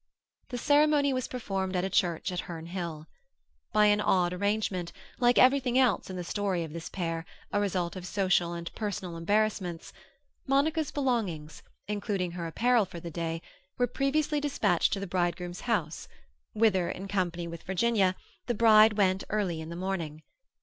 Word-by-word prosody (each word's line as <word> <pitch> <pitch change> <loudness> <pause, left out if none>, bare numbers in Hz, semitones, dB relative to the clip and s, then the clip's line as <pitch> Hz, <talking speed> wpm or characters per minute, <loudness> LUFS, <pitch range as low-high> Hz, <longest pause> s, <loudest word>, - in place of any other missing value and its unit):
The 245 - -4
ceremony 290 +1 +3
was 255 -1 -2
performed 195 -6 -3
at 180 - +1
a 190 - -1
church 175 +1 +1
at 180 - -3
Herne 165 -2 -6
Hill. 170 -3 -5 0.7
By 210 0 +4
an 210 0 +4
odd 180 -3 +2
arrangement—like 200 +4 -1
everything 255 -1 +4
else 255 -7 +2
in 185 - -5
the 180 - -4
story 190 -1 -1
of 155 -2 -8
this 165 -1 -6
pair, 165 -3 -3 0.3
a 205 - +2
result 185 -4 -1
of 180 -1 -6
social 180 -3 +1
and 170 0 -6
personal 190 -5 -4
embarrassments—Monica's 220 - -1
belongings, 215 - -2 0.3
including 200 -3 -2
her 170 -1 -4
apparel 235 +5 +2
for 180 -2 -9
the 170 0 -7
day, 165 0 -3 0.3
were 245 - +3
previously 290 +4 0
dispatched 215 - +1
to 195 - -1
the 200 - -4
bridegroom's 175 -1 -2
house, 175 -10 -2 0.5
whither, 205 -5 +2
in 195 - -5
company 175 -3 -1
with 170 0 -7
Virginia, 190 0 +1 0.3
the 240 - 0
bride 215 -1 +7
went 195 -2 +2
early 190 -6 -1
in 160 - -7
the 170 - -6
morning. 170 -4 -4
190 Hz, 160 wpm, -29 LUFS, 175-225 Hz, 0.7 s, bride